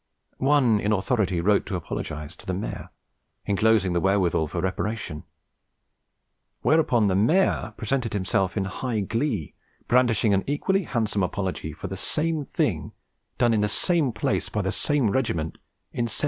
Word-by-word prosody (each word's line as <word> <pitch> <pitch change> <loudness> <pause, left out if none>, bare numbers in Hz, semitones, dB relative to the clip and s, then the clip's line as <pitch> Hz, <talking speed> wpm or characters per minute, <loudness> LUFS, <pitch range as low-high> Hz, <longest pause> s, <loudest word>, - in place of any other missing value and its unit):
One 130 -6 +4
in 105 +1 0
authority 95 -3 +1
wrote 100 +3 +2
to 95 - -2
apologise 75 -2 -5
to - - -13
the 95 - -1
maire, 100 - -5 0.6
enclosing 100 -2 +3
the 85 - +1
wherewithal 95 -4 +2
for 85 - -4
reparation: 95 -2 -3 1.4
whereupon 125 -9 +3
the 95 - +2
maire 155 - +2
presented 120 +1 -1
himself 95 0 0
in 95 - +1
high 110 +3 -2
glee, 110 - -2 0.3
brandishing 120 -4 +3
an 95 0 +2
equally 190 +7 +1
handsome 110 -6 -1
apology 90 -4 -2
for 80 +5 -9
the 95 0 -4
same 155 - -1
thing - - -1 0.4
done 120 -1 +3
in 110 - +2
the 105 - +1
same 165 -3 +1
place 105 - -1
by - - -1
the - - 0
same 140 -8 +1
Regiment 85 -12 -1 0.3
in 120 - 0
1711! - - -3
105 Hz, 155 wpm, -25 LUFS, 95-125 Hz, 1.4 s, One